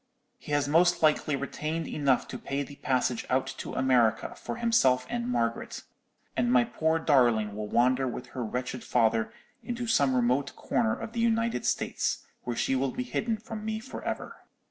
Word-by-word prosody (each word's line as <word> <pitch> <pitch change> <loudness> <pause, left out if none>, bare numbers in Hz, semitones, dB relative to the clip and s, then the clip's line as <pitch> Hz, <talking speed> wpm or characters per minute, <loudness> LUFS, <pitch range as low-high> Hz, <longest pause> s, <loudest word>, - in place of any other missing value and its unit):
He - - -9
has 145 -1 +2
most 170 +3 +3
likely 155 -1 +3
retained 155 +3 -3
enough 140 -4 +1
to 125 - -6
pay 140 +1 -2
the 140 0 -11
passage 130 -3 0
out 130 +1 +2
to - - -6
America 125 -4 +2
for - - -6
himself 230 - +3
and 240 0 -2
Margaret; 115 - -2 0.5
and 120 -2 +1
my 125 -1 +5
poor 160 +5 0
darling 120 -9 +3
will 105 0 -4
wander 130 +4 +2
with 125 0 -6
her 125 0 -4
wretched 125 +2 -4
father 115 -2 +2 0.3
into 240 +2 -3
some 140 - +3
remote 125 +3 +1
corner 110 -1 0
of 225 - -6
the 235 - -3
United 230 - +1
States, - - -1 0.2
where 120 - -2
she 135 - +1
will 135 +1 +1
be 255 - -3
hidden 230 -2 -1
from 220 0 -7
me 220 0 -2
for 245 +4 -8
ever.' - - -4
135 Hz, 180 wpm, -28 LUFS, -, 0.5 s, my